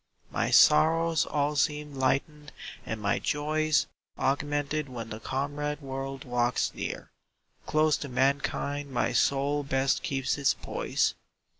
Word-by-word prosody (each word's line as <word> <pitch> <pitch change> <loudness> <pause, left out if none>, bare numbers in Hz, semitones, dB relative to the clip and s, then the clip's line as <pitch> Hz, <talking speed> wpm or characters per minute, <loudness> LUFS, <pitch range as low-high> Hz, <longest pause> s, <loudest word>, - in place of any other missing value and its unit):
My - - 0
sorrows 165 +1 +5
all 145 0 0
seem 150 0 0
lightened 145 +3 -1 0.4
and 110 - -3
my 105 -1 0
joys 155 +1 +1 0.3
Augmented 145 +1 -1
when 115 -3 -7
the 110 - -5
comrade 145 +4 -3
world 135 -1 -6
walks 120 -1 0
near; - - -5 0.6
Close 155 0 +3
to 145 - -6
mankind 140 +2 0
my 125 -1 0
soul 140 +4 +2
best 135 -1 0
keeps 135 +1 -1
its 140 - +3
poise. - - -1
140 Hz, 125 wpm, -28 LUFS, 135-150 Hz, 0.6 s, sorrows